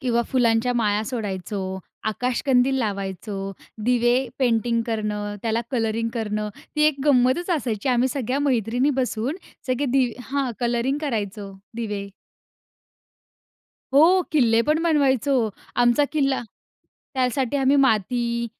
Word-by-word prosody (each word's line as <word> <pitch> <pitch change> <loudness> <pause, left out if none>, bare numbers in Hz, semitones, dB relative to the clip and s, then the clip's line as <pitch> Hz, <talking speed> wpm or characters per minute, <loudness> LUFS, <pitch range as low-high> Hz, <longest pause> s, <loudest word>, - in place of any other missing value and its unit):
किंवा 235 -2 +1
फुलांच्या 240 -1 +2
माळा 210 -2 +1
सोडायचो, 190 -4 -4 0.3
आकाशकंदील 250 +3 +1
लावायचो, 195 -2 -3 0.3
दिवे 240 0 +3 0.2
पेंटिंग 235 -2 +2
करणं, 210 -2 -2
त्याला 225 0 0
कलरिंग 230 -2 0
करणं, 215 -2 -2 0.3
ती 300 - +3
एक 305 -2 +2
गंमतच 270 +5 +3
असायची. 230 -3 -3
आम्ही 250 0 +3
सगळ्या 265 -1 -2
मैत्रिणी 250 -1 +1
बसून, 250 +4 -2 0.3
सगळे 260 +2 0
दि 255 -3 +2 0.2
हां, 275 -2 0
कलरिंग 240 +3 0
करायचो 205 -6 -3 0.2
दिवे. 205 -4 -4 1.9
हो. 345 +6 +6
किल्ले 235 -7 +4
पण 305 +1 +3
बनवायचो. 280 -4 +2 0.4
आमचा 245 +4 +4
किल्ला 275 -4 +1 0.7
त्यासाठी 260 +1 0
आम्ही 270 +1 +3
माती, 235 -1 +1
240 Hz, 115 wpm, -23 LUFS, 220-270 Hz, 1.9 s, हो